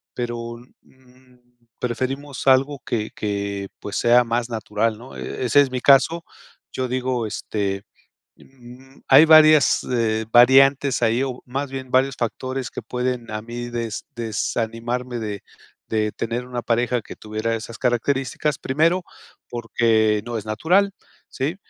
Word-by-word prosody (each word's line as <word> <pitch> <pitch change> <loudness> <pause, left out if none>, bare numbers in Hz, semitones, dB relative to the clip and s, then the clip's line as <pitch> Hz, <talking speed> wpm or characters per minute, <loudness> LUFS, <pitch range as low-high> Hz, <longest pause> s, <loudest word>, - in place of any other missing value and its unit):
pero, 120 -1 -4 0.3
mm, 130 -1 -24 0.4
preferimos 135 +3 -4
algo 135 +2 +4
que 110 -2 -2
que, 100 -1 -3
pues, 105 +2 -5
sea 120 +1 +5
más 120 +1 -2
natural, 110 0 -1
¿no?, 125 +3 -12
ese 130 +3 0
es 135 -2 0
mi 125 - -3
caso, 150 +6 +4 0.5
yo 130 -1 -2
digo, 125 -2 -1
este, 100 -1 -3 0.5
mm, 130 +1 -16
hay 140 +3 +8
varias, 155 -2 +6
eh, 110 -3 0
variantes 135 +2 +5
ahí 115 +3 +2
o 130 -2 -5
más 135 +2 -4
bien 130 -1 -7
varios 130 0 +2
factores 130 +2 -3
que - - -6
pueden 125 -2 -3
a 110 0 -4
mí 120 +2 -6
des 115 -2 -4
desanimarme 115 +2 -3
de 105 -3 -5 0.5
de 110 -1 0
tener 115 +2 -4
una 125 -1 -4
pareja 120 +1 0
que - - -11
tuviera 110 +1 -3
esas 115 0 -7
características, 130 +3 0
primero, 165 +7 +1 0.5
porque 110 -2 +1
no 120 -1 -3
es 105 - -5
natural, 175 - +2 0.4
sí, 140 +6 -3
120 Hz, 140 wpm, -22 LUFS, 115-130 Hz, 0.5 s, hay